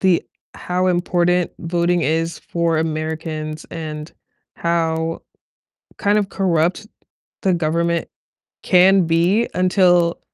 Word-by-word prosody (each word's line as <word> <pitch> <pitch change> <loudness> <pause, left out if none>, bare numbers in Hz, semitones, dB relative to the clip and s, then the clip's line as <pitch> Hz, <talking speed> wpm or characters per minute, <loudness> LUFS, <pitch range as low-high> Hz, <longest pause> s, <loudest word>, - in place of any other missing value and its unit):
the 185 -3 +3 0.3
how 180 +1 -1
important 175 0 +1
voting 175 +1 0
is 165 +2 -1
for 170 -2 -1
Americans 155 -1 -3
and 155 -1 -6 0.4
how 165 -1 -1 0.8
kind 205 +1 +2
of 205 -2 +1
corrupt 180 +2 0 0.5
the 190 -2 +2
government 170 +1 0 0.6
can 185 0 +5
be 175 +8 +2
until 180 -2 +3
170 Hz, 100 wpm, -20 LUFS, 160-180 Hz, 0.8 s, can